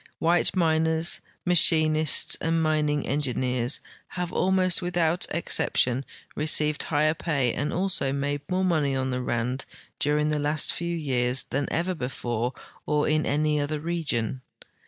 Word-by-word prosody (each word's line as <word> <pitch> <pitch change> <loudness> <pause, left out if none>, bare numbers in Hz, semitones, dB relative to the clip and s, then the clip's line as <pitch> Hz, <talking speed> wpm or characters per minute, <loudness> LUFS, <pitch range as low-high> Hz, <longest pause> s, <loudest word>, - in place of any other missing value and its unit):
White 170 +3 +1
miners, 160 -1 +2 0.2
machinists, 155 -3 +4
and 165 0 +1
mining 150 -2 +1
engi 140 -3 -1
neers 125 0 0 0.3
have 180 -1 -5
almost 185 -1 +2
without 175 -1 +1
exception 140 -5 0 0.3
received 150 0 +1
higher 155 0 +1
])ay 135 -7 +1
and 145 +1 -2
also 180 -7 0
made 145 +1 -2
more 185 +1 0
money 150 -6 +1
on 130 0 -1
the 125 0 -2
Rand 125 +2 -2 0.3
during 150 +1 +1
the 150 -1 0
last 150 +1 +1
few 170 0 -3
years 130 -4 0
than 140 +2 -1
ever 175 +4 0
before 125 -4 -3 0.3
or 150 0 +1
in 155 0 +1
any 150 +1 +1
other 145 +1 -2
region. 145 -7 -2
150 Hz, 140 wpm, -26 LUFS, 135-165 Hz, 0.3 s, machinists